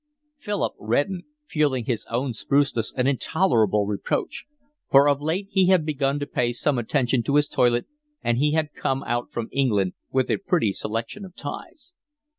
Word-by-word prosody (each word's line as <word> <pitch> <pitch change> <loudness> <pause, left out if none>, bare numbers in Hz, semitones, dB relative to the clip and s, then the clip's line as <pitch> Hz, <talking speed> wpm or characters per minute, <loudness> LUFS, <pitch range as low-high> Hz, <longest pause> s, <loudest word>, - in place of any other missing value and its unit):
Philip 205 -7 -2
reddened, 145 - -1 0.2
feeling 145 - 0
his 115 -3 -2
own 125 +2 -1
spruceness 135 -1 0
an 125 - +2
intolerable 120 - +2
reproach; 100 -1 -2 0.4
for 140 +1 +6
of 145 0 +2
late 170 +6 -1
he 190 -2 +3
had 185 -4 +4
begun 140 -2 0
to - - -1
pay 120 -4 -1
some 130 +1 0
attention 125 +1 +1
to 140 +5 -1
his 145 0 +4
toilet, 120 -1 +2 0.4
and 120 0 +1
he 150 +2 +2
had 155 -2 0
come 135 0 -1
out 120 +1 -2
from 115 -1 -3
England 105 -9 +1 0.2
with 130 -1 +1
a - - +2
pretty 175 - +1
selection 115 - -4
of 185 -2 -11
ties. 255 - -8
135 Hz, 170 wpm, -24 LUFS, 120-155 Hz, 0.4 s, for